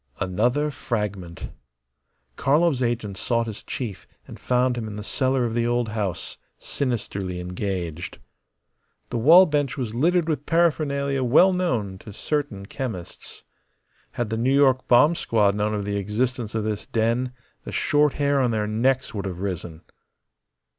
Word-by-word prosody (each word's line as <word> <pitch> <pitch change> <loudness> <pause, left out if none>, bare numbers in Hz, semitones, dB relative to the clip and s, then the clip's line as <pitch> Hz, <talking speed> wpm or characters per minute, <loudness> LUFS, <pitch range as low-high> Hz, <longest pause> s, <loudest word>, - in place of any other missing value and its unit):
Another 120 +11 +1
fragment. 100 -9 -4 0.8
Karlov's 145 - +2
agent 115 -5 -1
sought 115 +2 0
his 110 -2 -7
chief 115 -7 -6 0.2
and - - -10
found 125 0 +1
him 115 -2 -4
in 105 - -7
the 105 - -6
cellar 130 +2 0
of 115 - -2
the 120 0 +1
old 120 -1 0
house, 105 -5 -3 0.2
sinisterly 100 -8 -3
engaged. 90 -2 -4 0.9
The 120 - -1
wall 165 +10 +8
bench 145 -4 -1
was 120 -5 -3
littered 165 +7 +2
with 150 -3 -2
paraphernalia 140 -5 +1
well 155 +10 +5
known 115 - -1
to 105 - -11
certain 140 -6 -3
chemists. 110 -7 -7 0.7
Had 120 -3 -3
the 110 - -1
New 125 +4 +1
York 130 -2 +3
bomb 130 +7 +6
squad 105 -10 +2
known 105 +1 -1
of 100 -1 -3
the 100 0 -2
existence 110 +3 -2
of 110 - 0
this 105 -1 -3
den, 120 +1 0 0.3
the - - -7
short 150 -1 +2
hair 140 -1 +1
on 125 - +2
their 110 -2 0
necks 125 +5 0
would 100 -2 -4
have 90 -2 -5
risen. 90 -4 -5
120 Hz, 155 wpm, -24 LUFS, 105-135 Hz, 0.9 s, wall